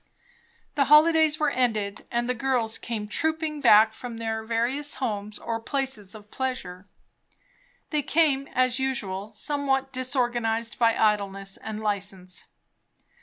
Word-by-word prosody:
The 280 -2 +2
holidays 310 +1 +5
were 300 -2 +2
ended, 220 -6 -1
and 240 0 -1
the 250 - +1
girls 245 -3 0
came 220 -3 -4
trooping 315 +4 -1
back 220 -3 +6
from 235 0 -8
their 225 -1 -3
various 240 +6 0
homes 210 -4 -3
or 230 -1 -3
places 230 -5 -2
of 210 -1 -13
pleasure. 205 -8 -4 1.0
They 300 -2 +1
came, 290 -2 +2
as 255 0 +2
usual, 210 -7 -2
somewhat 270 +3 -1
disorganized 240 -3 -1
by 230 -1 +3
idleness 195 -2 0
and 215 -1 -6
license. 195 -3 -3
235 Hz, 125 wpm, -26 LUFS, 210-270 Hz, 1.0 s, back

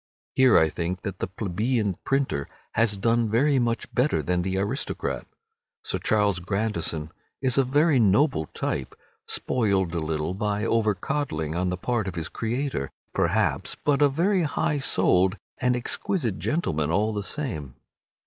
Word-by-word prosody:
Here 130 -2 +6
I 80 - +5
think 85 +3 -3
that 95 -2 -5
the - - -1
plebeian 105 +3 -1
printer 135 - 0 0.2
has 110 -3 +2
done 115 +2 +2
very 135 +5 +3
much 120 -1 -1
better 135 +5 +2
than 90 0 0
the 95 +1 -1
aristocrat. 105 +8 -2 0.6
Sir - - -1
Charles 105 -4 +2
Grandison 90 -5 -2 0.3
is 130 0 +2
a - - +5
very 145 +2 +3
noble 105 - +3
type—spoiled 95 - -2
a 85 - 0
little 80 +1 -2
by 105 +2 -1
over 110 -2 +2
coddling 90 - -2
on 90 +2 0
the 90 - -2
part 110 +1 -1
of 95 - -4
his 80 -2 -3
creator, 120 - -2 0.2
perhaps, - - +1
but 145 -1 +1
a 145 - +6
very 180 +7 +2
high 150 -1 0
souled 95 -5 +2 0.2
and 125 0 +2
exquisite 120 - -1
gentleman 85 - 0
all 105 +6 +1
the 105 - -2
same. 95 - -5
105 Hz, 150 wpm, -26 LUFS, 90-130 Hz, 0.6 s, Here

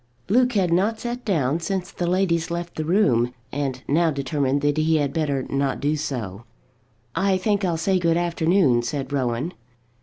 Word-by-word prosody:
Luke 250 +4 +3
had 185 -5 +2
not 210 +5 +1
sat 240 +1 -4
down 160 - +1
since 185 +2 -3
the 175 - -3
ladies 175 -2 +1
left 170 0 -4
the 155 - -3
room, 130 - +2 0.2
and 135 -2 -3
now 165 +3 +3
determined 140 -1 0
that 145 +1 +1
he 160 +1 +2
had 145 -3 0
better 145 -4 0
not 135 0 -1
do 150 +2 +1
so. 115 -9 -4 0.7
"I 190 0 +2
think 205 +1 0
I'll 175 -3 +1
say 185 +3 +1
good 170 -1 +2
afternoon," 170 -6 +2
said 135 +2 -4
Rowan. 130 +5 -1
160 Hz, 175 wpm, -23 LUFS, 140-185 Hz, 0.7 s, Luke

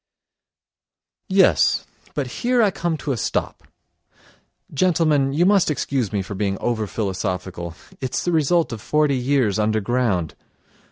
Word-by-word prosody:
Yes, 190 0 +4 0.3
but - - -1 0.2
here 245 -1 +3
I 205 - +3
come 170 -2 -2
to 145 - -3
a 130 - -1
stop! - - -2 1.1
Gentlemen, 155 -4 +2
you 160 +5 +2
must 195 -3 +4
excuse 135 -6 -1
me 100 -2 -1
for 95 - -7
being 100 0 -1
over 110 -1 -1
philosophical; 90 -3 -4 0.2
it's 130 -2 -2
the 175 - +1
result 165 0 +2
of 110 - -7
forty 150 +2 +1
years 125 -5 +1
underground! 110 -4 0
130 Hz, 130 wpm, -22 LUFS, 105-160 Hz, 1.1 s, Yes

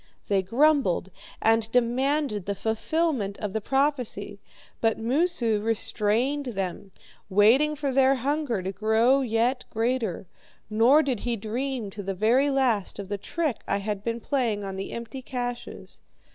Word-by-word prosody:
They 200 -2 +3
grumbled 235 - +2 0.3
and 225 0 +3
demanded 250 -2 +1
the 200 - -1
fulfilment 220 - -1
of 205 -3 -4
prophecy, 255 -8 -1 0.4
but 225 -1 +2
Moosu 235 -3 +1
restrained 230 +5 0
them, 195 +1 -4 0.4
waiting 235 +10 +4
for 285 -2 -2
their 265 +1 +4
hunger 270 -5 -1
to 190 - -2
grow 220 +7 +3
yet 245 +1 0
greater. 225 -5 -1 0.5
Nor 245 +8 +5
did 260 -6 -1
he 240 +1 -1
dream, 230 +1 -3
to 205 - -7
the 195 0 -4
very 240 +8 +3
last, 255 -8 +1
of 200 -1 -7
the 205 -1 -3
trick 310 - -2
I 200 - +1
had 200 0 -4
been 230 +1 -2
playing 235 -6 -1
on 195 -1 -5
the 195 +1 -5
empty 235 +3 -6
caches. 245 -1 -6
230 Hz, 145 wpm, -26 LUFS, 205-270 Hz, 0.5 s, Nor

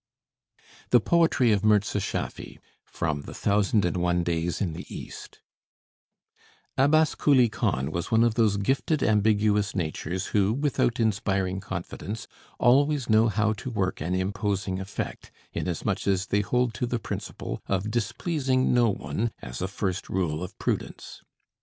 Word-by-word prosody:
THE 125 - +6
POETRY 160 -5 +3
OF 100 -1 +2
MIRZA 105 -1 +3
SCHAFFY - - -4 0.3
From 75 -3 -3
the - - -9
'Thousand 100 0 +2
and 90 - -1
One 90 0 +1
Days 85 0 -1
in 90 -5 -1
the - - -7
East' - - -9 1.3
Abbas 155 +4 +4
Kuli 130 -5 +4
Khan 95 - -1
was 85 +2 -3
one 115 +1 +4
of 120 -2 +3
those 110 -3 +2
gifted 135 +8 0
ambiguous 105 -1 +2
natures 85 +2 -2
who, 100 0 +3
without 135 -3 0
inspiring 95 -4 0
confidence, 95 +3 -6 0.3
always 140 0 +3
know 110 +1 +5
how 110 +1 +1
to 110 +4 -6
work 95 -8 -2
an 85 +4 -1
imposing 95 0 -1
effect, 95 +1 -5 0.2
inasmuch 90 +2 -2
as 95 -1 +2
they 105 -1 +1
hold 125 +2 0
to 120 +2 -2
the 120 - -1
principle - - -5
of 100 +2 -1
displeasing 130 - 0
no 120 -2 +4
one, 95 +5 -2
as - - -6
a 95 - 0
first 95 -1 -3
rule 85 -4 -1
of 90 - -8
prudence. - - -4
105 Hz, 145 wpm, -26 LUFS, 95-120 Hz, 1.3 s, THE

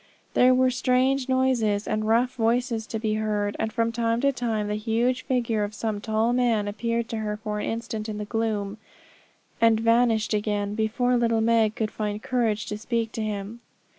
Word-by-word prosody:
There 255 +1 +5
were 255 0 +3
strange 255 +2 +1
noises 245 -6 +1
and 215 0 -1
rough 240 +3 +2
voices 235 -1 0
to 225 - -3
be 215 -1 -1
heard, 210 -1 -1
and 220 - -1
from 230 0 0
time 230 0 0
to 275 0 +3
time 225 -5 -2
the 210 - -2
huge 230 +4 0
figure 235 -4 0
of 205 +1 -4
some 215 -2 -3
tall 220 +2 +1
man 235 -4 +1
appeared 230 +2 -2
to 225 - -3
her 210 -1 -3
for 210 -1 -4
an - - -2
instant 225 -1 -4
in 210 - -4
the 210 - -4
gloom, 215 -1 -2 0.8
and 225 -1 +5
vanished 230 -1 +2
again 205 -1 -1
before 225 +3 +1
little 230 -1 +2
Meg 225 -1 +2
could 215 -1 -2
find 210 0 -4
courage 235 -5 0
to 210 - -5
speak 230 -1 -2
to 225 - -4
him. 210 +1 -4
225 Hz, 190 wpm, -25 LUFS, 215-240 Hz, 0.8 s, There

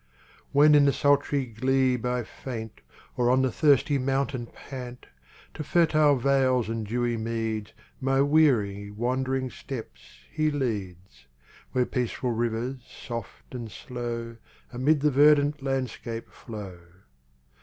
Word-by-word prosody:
When 150 +2 +6
in 145 -1 +6
the 140 - +4
sultry 145 -1 +2
glebe 125 +1 +1
I 125 0 -1
faint 110 -2 -8 0.3
Or 120 -1 +2
on 130 +1 +4
the 130 - +1
thirsty 145 +1 +3
mountain 135 -2 -1
pant, 125 -2 -9 0.5
To 155 - -5
fertile 155 -2 +4
vales 130 -2 +2
and 115 -2 -3
dewy 120 +1 -1
meads 110 -1 -3 0.3
My 135 0 +1
weary, 120 -10 +2
wandering 130 +4 -1
steps 130 -5 -8 0.3
He 155 0 +1
leads, 95 - -4 0.5
Where 125 -1 +2
peaceful 125 +1 -2
rivers, 120 +3 -2
soft 115 -2 -8
and 120 -3 -6
slow, 115 -1 -6 0.4
Amid 140 +4 +2
the 150 0 +3
verdant 145 +1 +4
landscape 130 -4 -4
flow. 100 -6 -9
125 Hz, 125 wpm, -27 LUFS, 115-140 Hz, 0.5 s, When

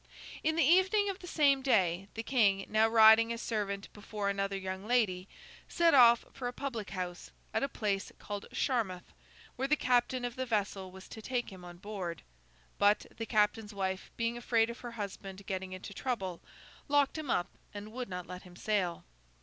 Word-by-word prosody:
In 315 +1 +2
the 330 - +3
evening 380 +6 +4
of 380 - -10
the 355 - -10
same 280 -5 +3
day, 190 -8 +2
the 225 - -3
King—now 215 -3 +3
riding 225 0 +7
as 230 - -3
servant 200 -4 -2
before 205 -1 -3
another 195 0 -1
young 190 +1 -5
lady—set 235 - 0
off 235 -3 +7
for 250 - -4
a - - -2
public 245 -6 -4
house 180 -2 -5 0.2
at - - +1
a 275 - 0
place 200 -5 -2
called 205 -1 -6
Charmouth, 215 -9 -1 0.4
where 265 +2 0
the 300 - +4
captain 250 -2 +1
of 245 -1 -4
the 260 0 -2
vessel 200 -4 -1
was 190 +1 -12
to 220 - -9
take 245 0 -2
him 185 -2 -11
on 175 0 -10
board. 185 -4 -5 0.6
But, 205 +1 +4
the 225 - -5
captain's 210 -1 +1
wife, 190 -1 -2
being 230 +1 -1
afraid 230 -1 +2
of 235 - -10
her 240 -1 -7
husband 200 -2 -7
getting 190 -1 -4
into 185 +2 -7
trouble, 195 -8 -3 0.5
locked 285 -1 +3
him 300 -4 -6
up 175 - +1 0.2
and 205 +1 -8
would 250 0 -5
not 180 -1 -5
let 180 0 -8
him 180 -2 -15
sail. 185 -3 -1
215 Hz, 180 wpm, -32 LUFS, 195-245 Hz, 0.6 s, riding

